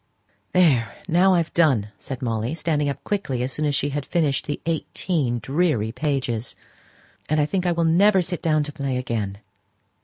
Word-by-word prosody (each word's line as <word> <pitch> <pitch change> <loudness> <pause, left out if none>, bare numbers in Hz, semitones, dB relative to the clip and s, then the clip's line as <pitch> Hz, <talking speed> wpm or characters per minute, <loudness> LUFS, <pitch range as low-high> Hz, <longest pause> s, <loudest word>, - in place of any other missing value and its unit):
"There, 135 - +3
now 185 +2 +4
I've 170 -2 0
done!" 135 -11 +3
said 130 -1 -6
Molly, 115 +4 -1
standing 150 -3 0
up 140 - -5
quickly 140 -12 -2
as 130 - -2
soon 155 - -2
as 145 -1 +1
she 145 - 0
had 145 0 -3
finished 150 -4 0
the 145 - -3
eighteen 160 -5 -1
dreary 135 -5 0
pages; 125 -4 -2 0.7
"and 155 +1 +2
I 150 - +3
think 185 +3 -1
I - - +3
will 170 -1 +1
never 190 +4 +4
sit 175 0 -4
down 155 -2 +2
to 150 - -5
play 140 -4 -2
again!" 110 -6 -3
150 Hz, 180 wpm, -23 LUFS, 125-170 Hz, 0.7 s, now